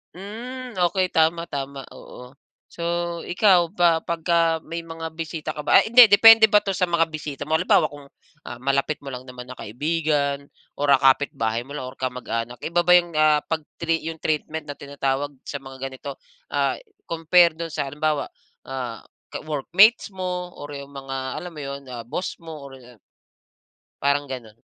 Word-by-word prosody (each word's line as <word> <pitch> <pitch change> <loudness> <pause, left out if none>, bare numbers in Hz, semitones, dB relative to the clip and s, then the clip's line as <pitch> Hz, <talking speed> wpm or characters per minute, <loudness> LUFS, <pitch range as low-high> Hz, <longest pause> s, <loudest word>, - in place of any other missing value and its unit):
Hmm 245 +7 -7 0.2
okey, 185 +1 -1
tama 165 +1 +2
tama, 140 -1 -5
oo. 125 0 -12 0.4
So, 170 - -8 0.4
ikaw 180 -3 +3
ba 170 -4 +3
pagka 165 -1 +1
may 165 +1 -6
mga 165 0 -6
bisita 160 -1 -4
ka 150 - -5
ba - - +6
ay - - 0
hindi, 245 +1 +10
depende 225 +2 +9
ba 210 - +7
'to 195 - -1
sa 185 - -1
mga 170 -1 +2
bisita 150 -3 -6
mo? 160 - +2
Halimbawa, - - +3
kung, 145 -1 -12 0.4
ah, 120 - -7
malapit 140 +3 0
mo - - -11
lang 125 0 -7
naman 125 -1 -9
na 130 - -9
kaibigan 140 +3 -1 0.3
or, 145 0 +2
ah, 135 - +6
kapitbahay 125 -4 +2
mo 135 - -15
lang 130 -3 -5
or 130 - -10
kamag-anak, 125 -2 -4
iba 170 +2 +1
ba - - +6
yung, 175 -1 +3
ah, 155 -1 +4
pag-tri 165 +1 -2
yung 160 - -12
treatment 155 0 -2
na 145 - -6
tinatawag 140 0 -2 0.2
sa 140 - -4
mga 135 0 -11
ganito, 135 +1 -8 0.3
ah, - - +1 0.3
compare 165 0 +4
do'n 165 0 -5
sa 145 -2 -2
halimbawa, 150 +1 -1 0.4
ah, 125 -4 -5 0.3
ka - - -5
workmates 180 - +4
mo 180 -1 -4
or 145 - -7
yung 140 0 -9
mga 135 -1 -7 0.2
alam 180 - -8
mo 155 - -10
yun? 140 0 -6
Ah 120 -2 -6
boss 180 +9 -4
mo 160 -3 -9
or 135 -1 -11
ah 120 -2 -17 1.0
parang 140 0 +1
ganun. 115 -5 -8
150 Hz, 175 wpm, -23 LUFS, 135-170 Hz, 1.0 s, hindi